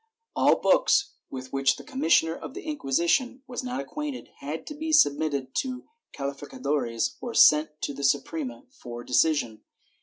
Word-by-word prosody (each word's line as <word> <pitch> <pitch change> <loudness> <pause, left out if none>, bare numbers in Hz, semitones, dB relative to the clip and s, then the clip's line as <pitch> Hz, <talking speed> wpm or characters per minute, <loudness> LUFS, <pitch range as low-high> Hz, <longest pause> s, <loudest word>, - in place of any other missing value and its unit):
All - - +5
books, - - +3 0.2
with 130 0 -8
which 135 -1 +3
the - - -11
commissioner 165 - +2
of 260 - -9
the - - -7
Inquisition 255 - 0
was 255 -1 -5
not 250 +1 -3
acquainted, 290 -2 -5
had 150 +3 -5
to - - -6
be 315 +2 -4
submitted 145 - +2
to 255 -1 -2 0.3
cahficadores 140 -3 -2
or 240 -2 -5
sent 150 0 +5
to 145 - -2
the 140 +1 -7
Suprema 135 -3 -1
for 120 0 -9
decision. 125 -5 +1
150 Hz, 150 wpm, -26 LUFS, -, 0.3 s, All